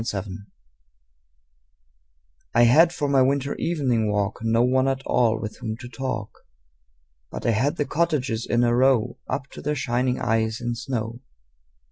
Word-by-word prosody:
Good 115 Hz, -, -3 dB
Hours 100 Hz, +1 st, -3 dB, 2.3 s
I 120 Hz, -, +6 dB
HAD 160 Hz, +9 st, +6 dB
for 150 Hz, -4 st, -2 dB
my 140 Hz, -1 st, +3 dB
winter 140 Hz, +1 st, +1 dB
evening 125 Hz, -10 st, 0 dB
walk 105 Hz, 0 st, -1 dB
No 115 Hz, +1 st, +2 dB
one 130 Hz, +1 st, +2 dB
at 135 Hz, 0 st, -1 dB
all 115 Hz, -2 st, +2 dB
with 110 Hz, -1 st, -6 dB
whom 110 Hz, -1 st, -5 dB
to 120 Hz, -, -9 dB
talk, 115 Hz, -3 st, -5 dB, 0.9 s
But -, -, -7 dB
I 115 Hz, -, +3 dB
had 130 Hz, +7 st, +1 dB
the 145 Hz, -, -1 dB
cottages 140 Hz, -9 st, -1 dB
in 120 Hz, 0 st, +2 dB
a 120 Hz, 0 st, +3 dB
row 125 Hz, -2 st, +2 dB
Up 135 Hz, -, -2 dB
to -, -, -9 dB
their 150 Hz, +1 st, -1 dB
shining 125 Hz, -1 st, 0 dB
eyes 110 Hz, 0 st, 0 dB
in 120 Hz, 0 st, -2 dB
snow. 115 Hz, -1 st, -4 dB
120 Hz, 160 wpm, -24 LUFS, 115-135 Hz, 2.3 s, I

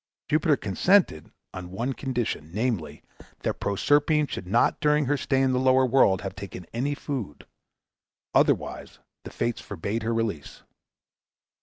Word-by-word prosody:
Jupiter 155 Hz, -1 st, +3 dB
consented 105 Hz, -, +2 dB, 0.2 s
on 90 Hz, -1 st, -7 dB
one 120 Hz, +8 st, -2 dB
condition, 125 Hz, -, -3 dB
namely, 110 Hz, -4 st, -2 dB, 0.4 s
that -, -, -2 dB
Proserpine 145 Hz, -, +2 dB
should 95 Hz, -, -6 dB
not 115 Hz, +6 st, +2 dB
during 150 Hz, 0 st, +2 dB
her 145 Hz, +3 st, +1 dB
stay 135 Hz, -1 st, +1 dB
in 130 Hz, -, +2 dB
the 125 Hz, -, +1 dB
lower 130 Hz, 0 st, +4 dB
world 120 Hz, -7 st, +3 dB
have 95 Hz, -, -4 dB
taken 95 Hz, -3 st, -8 dB
any 140 Hz, +5 st, -1 dB
food; 130 Hz, -, -5 dB, 0.9 s
otherwise, -, -, +1 dB, 0.3 s
the -, -, -6 dB
Fates 120 Hz, -1 st, -2 dB
forbade 100 Hz, +8 st, -4 dB
her 115 Hz, +2 st, -1 dB
release. 110 Hz, -10 st, -3 dB
120 Hz, 140 wpm, -26 LUFS, 100-140 Hz, 0.9 s, lower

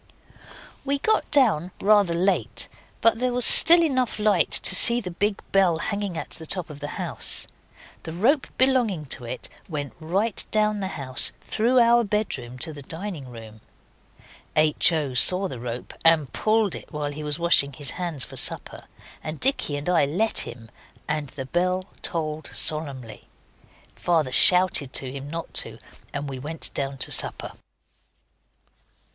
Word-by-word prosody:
We 280 Hz, 0 st, -2 dB
got 435 Hz, +10 st, -1 dB
down 220 Hz, -, +2 dB
rather 200 Hz, -4 st, +2 dB
late, 185 Hz, +3 st, -1 dB, 0.3 s
but 230 Hz, 0 st, +3 dB
there 250 Hz, 0 st, -1 dB
was 245 Hz, -1 st, +1 dB
still 340 Hz, +1 st, +10 dB
light -, -, +2 dB
enough 260 Hz, -6 st, -1 dB
to 205 Hz, -3 st, +3 dB
see 235 Hz, +5 st, +10 dB
the 185 Hz, -6 st, -7 dB
big 200 Hz, +3 st, -2 dB
bell 190 Hz, -4 st, +2 dB
hanging 200 Hz, 0 st, -4 dB
at -, -, -7 dB
the 160 Hz, -, -9 dB
top 180 Hz, -3 st, -1 dB
of 145 Hz, -, -11 dB
the 145 Hz, -, -6 dB
house. -, -, -3 dB, 0.6 s
The 160 Hz, -, -8 dB
rope 245 Hz, -, 0 dB
belonging 245 Hz, -, 0 dB
to 125 Hz, -, -9 dB
it 125 Hz, +2 st, -7 dB, 0.2 s
went 145 Hz, -6 st, -6 dB
right 195 Hz, +7 st, -1 dB
down 215 Hz, -1 st, 0 dB
the 190 Hz, -, -4 dB
house, 130 Hz, -2 st, -1 dB
through 235 Hz, +4 st, -1 dB
our 235 Hz, 0 st, +4 dB
bedroom 190 Hz, -, -4 dB
to 160 Hz, -, -9 dB
the 145 Hz, -, -11 dB
dining 160 Hz, -2 st, -7 dB
room. 110 Hz, -2 st, -13 dB, 0.9 s
H. 155 Hz, +2 st, +2 dB
O. 150 Hz, -5 st, -3 dB
saw 180 Hz, +10 st, +4 dB
the 130 Hz, -9 st, -9 dB
rope 120 Hz, 0 st, -7 dB
and 165 Hz, -4 st, +3 dB
pulled 215 Hz, -4 st, 0 dB
it -, -, -10 dB
while 150 Hz, -2 st, -4 dB
he 150 Hz, +1 st, -9 dB
was 150 Hz, 0 st, -2 dB
washing 170 Hz, -5 st, +2 dB
his 140 Hz, +1 st, -1 dB
hands 170 Hz, -7 st, -4 dB
for -, -, -7 dB
supper, -, -, 0 dB, 0.4 s
and 155 Hz, 0 st, -7 dB
Dicky 250 Hz, -, +2 dB
and 145 Hz, -, -7 dB
I 175 Hz, -5 st, +2 dB
let 190 Hz, +11 st, -1 dB
him, 115 Hz, -2 st, -7 dB, 0.4 s
and 150 Hz, -2 st, -3 dB
the 135 Hz, -1 st, -8 dB
bell 180 Hz, +5 st, -2 dB, 0.2 s
tolled 155 Hz, -2 st, -5 dB
solemnly. 140 Hz, -7 st, -3 dB, 0.7 s
Father 160 Hz, -7 st, -1 dB
shouted 180 Hz, -3 st, +3 dB
to 130 Hz, -2 st, -4 dB
him 140 Hz, +1 st, -9 dB
not 165 Hz, +1 st, -7 dB
to, -, -, -9 dB, 0.3 s
and 145 Hz, 0 st, -5 dB
we 135 Hz, -2 st, -7 dB
went 155 Hz, +4 st, -5 dB
down 135 Hz, 0 st, -4 dB
to -, -, -1 dB
supper. -, -, 0 dB
165 Hz, 165 wpm, -23 LUFS, 145-210 Hz, 0.9 s, still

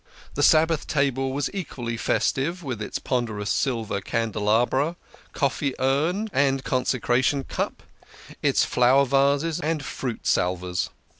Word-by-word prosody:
The 145 Hz, -, -2 dB
Sabbath 160 Hz, +1 st, +4 dB
table 135 Hz, -2 st, 0 dB
was 140 Hz, +1 st, -2 dB
equally 125 Hz, -11 st, -4 dB
festive 150 Hz, +8 st, 0 dB
with 125 Hz, -7 st, -4 dB
its 105 Hz, -, -3 dB
ponderous 115 Hz, -5 st, -2 dB
silver 115 Hz, -6 st, -1 dB
candelabra, 115 Hz, +7 st, +1 dB, 0.4 s
coffee 140 Hz, -1 st, -1 dB
urn, 155 Hz, +11 st, +1 dB
and 135 Hz, -1 st, +2 dB
consecration 130 Hz, +1 st, +1 dB
cup, -, -, -4 dB, 0.6 s
its -, -, +3 dB
flower 130 Hz, +3 st, +4 dB
vases, 140 Hz, +4 st, +2 dB
and 155 Hz, -1 st, -2 dB
fruit 125 Hz, -3 st, -5 dB
salvers. 90 Hz, 0 st, 0 dB
135 Hz, 120 wpm, -24 LUFS, 115-145 Hz, 0.6 s, Sabbath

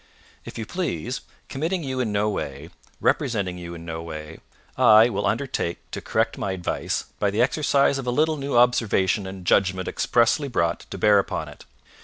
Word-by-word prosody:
If -, -, -9 dB
you 110 Hz, -, -4 dB
please, 165 Hz, -, -3 dB, 0.3 s
committing 165 Hz, +5 st, -2 dB
you 130 Hz, -2 st, -3 dB
in 120 Hz, -4 st, 0 dB
no 105 Hz, +1 st, +1 dB
way, 75 Hz, -6 st, -4 dB, 0.3 s
representing 95 Hz, -6 st, 0 dB
you 85 Hz, 0 st, -7 dB
in 85 Hz, 0 st, -10 dB
no 80 Hz, -1 st, -5 dB
way, 80 Hz, -1 st, -8 dB, 0.4 s
I 110 Hz, +2 st, +7 dB
will 100 Hz, -3 st, -1 dB
undertake 130 Hz, -11 st, -1 dB
to -, -, -5 dB
correct -, -, -1 dB
my 95 Hz, -, -2 dB
advice 90 Hz, -2 st, -2 dB, 0.2 s
by 100 Hz, -, +2 dB
the 105 Hz, +4 st, +2 dB
exercise 140 Hz, 0 st, +2 dB
of 130 Hz, -, -6 dB
a -, -, +2 dB
little 155 Hz, +5 st, +2 dB
new 140 Hz, -2 st, -1 dB
observation 110 Hz, -5 st, +3 dB
and 95 Hz, -1 st, -8 dB
judgment 95 Hz, 0 st, +2 dB
expressly 120 Hz, +5 st, +2 dB
brought 85 Hz, -9 st, -1 dB
to -, -, -6 dB
bear 105 Hz, +2 st, +5 dB
upon -, -, -3 dB
it. -, -, -14 dB
105 Hz, 180 wpm, -24 LUFS, 90-130 Hz, 0.4 s, I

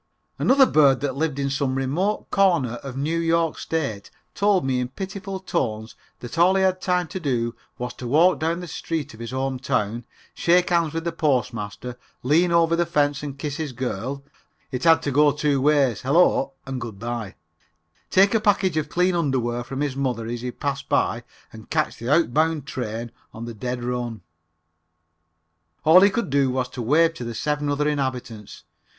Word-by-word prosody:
Another 270 Hz, +1 st, +5 dB
bird 140 Hz, -, +4 dB
that 140 Hz, -2 st, -2 dB
lived 150 Hz, -1 st, -1 dB
in 140 Hz, -1 st, -1 dB
some 135 Hz, -1 st, -1 dB
remote 155 Hz, +11 st, -1 dB
corner 170 Hz, -, +2 dB
of 135 Hz, -2 st, -7 dB
New 155 Hz, +4 st, -1 dB
York 165 Hz, -1 st, +1 dB
State 135 Hz, -11 st, -3 dB, 0.2 s
told 200 Hz, -5 st, +2 dB
me 130 Hz, -1 st, 0 dB
in 125 Hz, -, -1 dB
pitiful 190 Hz, -, -6 dB
tones 110 Hz, -, -3 dB, 0.3 s
that 125 Hz, +7 st, -6 dB
all 180 Hz, +3 st, +5 dB
he 190 Hz, -, +3 dB
had 185 Hz, -1 st, +1 dB
time 180 Hz, -2 st, 0 dB
to 190 Hz, -, -5 dB
do 120 Hz, -7 st, -1 dB, 0.2 s
was 125 Hz, 0 st, -4 dB
to 125 Hz, -, -7 dB
walk 165 Hz, +8 st, +4 dB
down 165 Hz, +2 st, -1 dB
the 175 Hz, -, -7 dB
street 160 Hz, -3 st, -4 dB
of 110 Hz, -, -14 dB
his 115 Hz, -1 st, -6 dB
home 130 Hz, 0 st, -2 dB
town, 120 Hz, -3 st, -1 dB, 0.3 s
shake 180 Hz, +1 st, +2 dB
hands 170 Hz, -3 st, +2 dB
with 165 Hz, -, -2 dB
the 170 Hz, -, -1 dB
Postmaster, 125 Hz, -6 st, -2 dB, 0.2 s
lean 165 Hz, +7 st, +3 dB
over 170 Hz, 0 st, +3 dB
the 170 Hz, 0 st, 0 dB
fence 145 Hz, -3 st, +1 dB
and 140 Hz, -2 st, -6 dB
kiss 145 Hz, 0 st, -4 dB
his 155 Hz, -5 st, -4 dB
girl 130 Hz, +2 st, -4 dB, 0.5 s
(it 130 Hz, +3 st, -3 dB
had 165 Hz, -1 st, +5 dB
to 145 Hz, -, -1 dB
go 145 Hz, +2 st, +5 dB
two 145 Hz, -1 st, 0 dB
ways, 140 Hz, -6 st, +2 dB
Hello 140 Hz, -1 st, +3 dB
and 130 Hz, -2 st, -5 dB
Good 115 Hz, -4 st, -6 dB
by), 115 Hz, -2 st, -5 dB, 0.7 s
take 195 Hz, +2 st, +4 dB
a 225 Hz, -, +4 dB
package 200 Hz, -5 st, +2 dB
of 150 Hz, -1 st, -1 dB
clean 180 Hz, +2 st, +2 dB
underwear 125 Hz, -7 st, 0 dB
from 135 Hz, +3 st, -5 dB
his 145 Hz, -3 st, -1 dB
mother 125 Hz, -4 st, -2 dB
as 120 Hz, +1 st, -4 dB
he 125 Hz, -, -3 dB
passed 140 Hz, +2 st, -4 dB
by -, -, +1 dB, 0.3 s
and -, -, -12 dB
catch -, -, 0 dB
the 115 Hz, +2 st, -5 dB
outbound 155 Hz, -1 st, +2 dB
train 120 Hz, -3 st, -5 dB, 0.2 s
on 115 Hz, +1 st, -6 dB
the 120 Hz, -, -6 dB
dead 125 Hz, +3 st, -4 dB
run. 120 Hz, -3 st, -3 dB, 1.6 s
All 165 Hz, +4 st, +8 dB
he 200 Hz, -, +6 dB
could 230 Hz, -, -2 dB
do 140 Hz, -1 st, +3 dB
was 125 Hz, 0 st, -1 dB
to 125 Hz, -, -6 dB
wave 160 Hz, +8 st, +3 dB
to 145 Hz, -, -7 dB
the 120 Hz, -1 st, -5 dB
seven 150 Hz, +3 st, -1 dB
other 145 Hz, +1 st, 0 dB
inhabitants. 130 Hz, -7 st, -4 dB
140 Hz, 190 wpm, -23 LUFS, 125-165 Hz, 1.6 s, All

